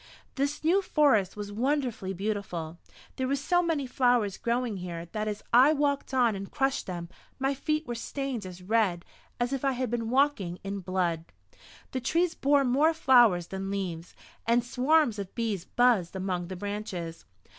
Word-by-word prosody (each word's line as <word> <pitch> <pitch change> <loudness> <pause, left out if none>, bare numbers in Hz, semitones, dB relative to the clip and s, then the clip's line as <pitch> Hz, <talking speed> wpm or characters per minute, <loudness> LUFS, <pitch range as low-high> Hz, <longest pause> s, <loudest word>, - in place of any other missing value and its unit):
This 285 +2 -2
new 355 +5 +4
forest 275 - +2
was 205 -1 -5
wonderfully 245 -4 -1
beautiful. 190 -4 -4 0.4
There 260 - -1
were 275 - +1
so 350 +6 +2
many 325 -5 0
flowers 245 -6 +2
growing 235 -2 -1
here 170 -2 -6
that 215 0 -2
as 210 -1 -4
I 260 +6 +7
walked 285 -2 0
on 245 -5 +3
and 195 0 -6
crushed 270 0 -1
them, 175 -2 -5 0.3
my 270 +1 0
feet 305 +3 -1
were 240 - -4
stained 255 0 -4
as 180 -1 -9
red 195 -4 +1 0.3
as 240 +2 0
if 270 - -3
I 270 -1 +2
had 255 -2 -2
been 230 -2 -2
walking 255 -10 +1
in 195 0 -4
blood. 175 -3 -1 0.7
The 260 - -3
trees 335 +7 +1
bore 285 -2 +3
more 295 +6 +3
flowers 240 - +5
than 195 0 -4
leaves, 180 -4 -4 0.3
and 235 +1 +3
swarms 250 -1 +2
of 195 -2 -6
bees 215 -6 -2
buzzed 230 -8 +2
among 185 -2 -2
the 185 - -6
branches. 185 -4 -5
230 Hz, 170 wpm, -28 LUFS, 190-270 Hz, 0.7 s, I